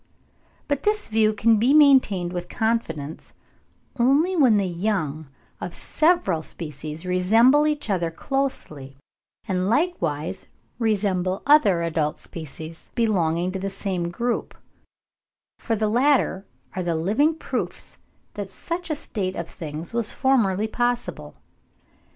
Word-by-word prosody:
But 285 -1 -1
this 420 0 0
view 215 -1 +3
can 215 +1 +3
be 255 +6 +4
maintained 255 - +5
with 175 0 -5
confidence, 165 -10 -2 0.7
only 285 +10 +3
when 255 -10 +5
the 200 - +1
young 170 -5 -2 0.3
of 175 - -6
several 310 - +1
species 155 +1 -6
resemble 225 +11 +4
each 300 -1 -1
other 180 -5 0
closely, 160 - -4 0.5
and 185 -1 0
likewise 195 - -1 0.3
resemble 195 -4 0
other 215 - +5
adult 155 -2 -1
species 160 0 -9
belonging 180 -6 +1
to 190 - -4
the 195 +1 -3
same 190 -3 -3
group; 235 +7 -3 1.0
for 225 - -1
the 215 0 0
latter 240 -4 +2 0.3
are 185 - -1
the 170 -2 -1
living 220 - +2
proofs - - -5 0.3
that 205 -2 -5
such 345 - -5
a 310 - 0
state 200 -10 -3
of 170 - -4
things 160 +2 -7
was 230 -2 0
formerly 220 -6 +2
possible. 240 +2 -2
200 Hz, 125 wpm, -24 LUFS, 170-245 Hz, 1.0 s, maintained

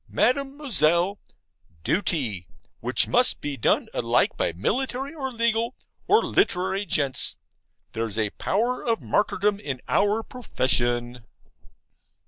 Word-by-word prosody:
Mademoiselle; 220 - +1 0.6
duty, 130 - -1 0.3
which - - +2
must - - +3
be 145 -1 -4
done 115 - +1
alike - - +1
by - - 0
military, 260 - -2
or 270 -4 -4
legal, 230 0 0 0.3
or 430 +3 +4
literary 195 - 0
gents. 140 -4 +2 0.6
There's 115 -2 -3
a 110 -2 0
power 240 +5 -1
of 230 -2 0
martyrdom 205 0 0
in 140 -10 -5
our 210 +2 +2
profession. 120 - -1
200 Hz, 110 wpm, -24 LUFS, -, 0.6 s, or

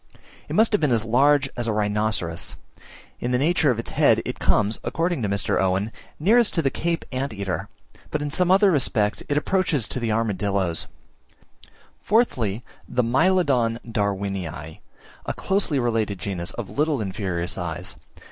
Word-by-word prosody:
It - - -4
must 220 +1 +5
have 210 - +2
been 150 -4 +2
as 115 -2 +2
large 135 +4 +4
as 120 -1 -3
a - - +1
rhinoceros: 105 -4 -1 0.6
in 120 - -2
the 125 - +3
structure 155 +2 +2
of 125 - +1
its 115 - -4
head - - +4
it - - -4
comes 105 +1 +2
according 170 -2 -1
to 105 - -1
Mr. 100 +1 +1
Owen, 95 +3 0 0.3
nearest 220 +8 +4
to 165 - +1
the 135 - +1
Cape 170 0 -2
Anteater, 105 - -3 0.4
but 150 - -1
in 145 0 -3
some 180 +4 +1
other 195 +1 +5
respects 110 -8 +1
it 145 - +1
approaches 155 - +1
to - - -1
the 115 -2 -2
armadilloes. 100 -5 0 1.1
Fourthly, 125 - +1 0.3
the 125 0 +1
Mylodon 130 -4 +2
Darwinii, 95 - -3 0.5
a - - -1
closely 190 -7 0
related 115 -5 0
genus 90 -2 -4
of 105 -5 -6
little 150 +4 +1
inferior 95 -4 -2
size. 85 -3 -4
115 Hz, 155 wpm, -24 LUFS, 100-150 Hz, 1.1 s, must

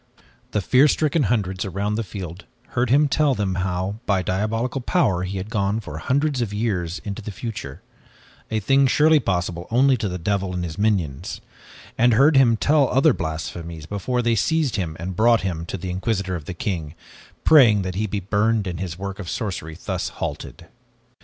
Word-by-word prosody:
The 105 - -1
fear 130 +8 +5
stricken 155 -1 +1
hundreds 95 -5 0
around 100 +2 -2
the 115 +2 -1
field 95 -2 -8 0.2
heard 120 -1 0
him 145 +4 +4
tell 145 -1 +2
them 100 -3 -1
how, 95 +2 -2
by 95 -3 +2
diabolical 115 +8 -1
power, 120 - +1
he 95 +1 -4
had 100 +4 -6
gone 100 +1 0
for 80 -8 -7
hundreds 140 - 0
of 115 -4 -2
years 95 -5 -2
into 100 +2 -5
the 105 - -7
future, 100 - -7 0.7
a 110 - 0
thing 135 +5 +3
surely 155 +4 +5
possible 90 -5 -2
only 130 +3 +4
to 105 -3 -2
the 90 - -4
devil 95 +1 -1
and 90 - -2
his 85 +2 -6
minions, 95 -11 -1 0.6
and 120 0 +5
heard 140 +6 +5
him 120 -4 +5
tell 145 +2 +3
other 135 +3 +4
blasphemies 80 0 -5
before 120 +7 -2
they 120 0 +2
seized 150 +5 +1
him 85 -6 -3
and 90 +2 -5
brought 115 +3 +4
him 85 -3 -3
to 95 - -4
the 90 +1 -5
Inquisitor 95 0 -1
of 80 -4 -6
the 90 - -6
King, 85 -8 -3 0.5
praying 115 -10 +6
that 95 0 -3
he 105 +4 -1
be 100 0 -2
burned 105 +3 +1
and 90 -3 -4
his 90 -3 -4
work 100 +1 -6
of 90 -5 -6
sorcery 85 -7 -4
thus - - -2
halted. - - -6
100 Hz, 190 wpm, -22 LUFS, 90-120 Hz, 0.7 s, praying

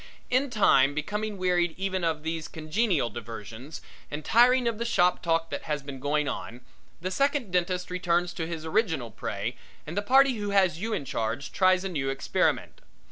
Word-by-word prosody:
In 265 +3 +2
time 145 - +4
becoming 210 +7 -3
wearied 175 -2 +1
even 190 -1 -2
of 160 -2 0
these 160 0 -3
congenial 160 - 0
diversions 115 +5 -8 0.3
and 150 0 -6
tiring 245 +2 +5
of 230 -2 -1
the - - 0
shop 180 -6 +2
talk 165 -1 0
that - - -4
has 150 -2 -2
been 140 -1 -7
going 145 +2 0
on, 120 -1 -5 0.4
the 185 +2 -3
second 275 -1 0
dentist 180 0 0
returns 175 -1 0
to 160 - -3
his 165 -2 -5
original 160 - 0
prey - - -4 0.3
and 155 - -6
the 205 - +1
party 265 +3 +4
who 205 -1 -3
has 190 -5 +3
you 225 +4 -3
in 145 - -2
charge 125 0 -3
tries 185 -1 +3
a 195 - -2
new 145 -6 -2
experiment. 135 0 0
175 Hz, 185 wpm, -27 LUFS, 150-205 Hz, 0.4 s, tiring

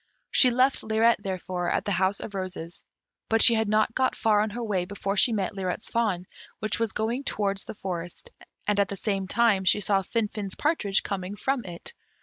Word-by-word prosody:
She 255 - +6
left 255 +2 +2
Lirette, 220 +1 +2
therefore, 185 -2 -3
at - - -1
the 205 - -1
House 190 +1 +1
of 205 - -7
Roses; 185 -3 -6 0.5
but 225 - +3
she 235 - +8
had 220 -2 +1
not 215 +1 +2
got 260 +1 +1
far 215 -2 +2
on 215 +1 +1
her 240 +3 -5
way 200 -5 0
before 200 +1 -3
she 235 - +5
met 200 -3 -1
Lirette's 190 0 -4
fawn, 210 -6 0 0.3
which 215 -2 -2
was 230 -3 0
going 235 +5 -2
towards 200 -5 -1
the - - -8
forest, 175 -3 -6 0.4
and 210 -1 +2
at 200 -2 +2
the 200 - -5
same 195 -1 -2
time 210 -2 +3
she 190 - +4
saw 200 -1 +1
Finfin's 210 -1 -3
partridge 290 -11 +1
coming 195 0 -4
from 265 +3 -1
it. 175 - -8
205 Hz, 200 wpm, -26 LUFS, 190-225 Hz, 0.5 s, she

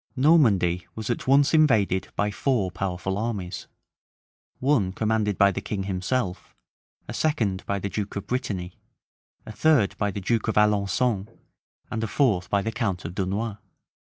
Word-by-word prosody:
{1449.} 125 - +4
Normandy 90 - -17
was 110 +1 -3
at 120 - -4
once 140 +2 +4
invaded 110 - +3
by 105 0 0
four 105 -4 0
powerful 95 +1 -3
armies: 105 -6 -4 0.9
one 125 -9 +2
commanded 110 -1 0
by 100 0 +5
the 100 - -4
king 100 -1 -3
himself; 95 +1 -3 0.5
a - - -6
second 115 -12 0
by 100 - 0
the 100 - -3
duke 105 0 -4
of 100 - -4
Brittany; 95 -8 -3 0.7
a - - -7
third 140 -3 +3
by 105 - +1
the 100 - -4
duke 110 +3 0
of 110 - 0
Alençon; 105 +1 +2 0.6
and 110 +1 -2
a - - -1
fourth 105 -8 +1
by 100 -1 +1
the 115 - -2
count 100 -6 -2
of 85 - -5
Dunois. 100 +3 -2
105 Hz, 160 wpm, -25 LUFS, 95-120 Hz, 0.9 s, by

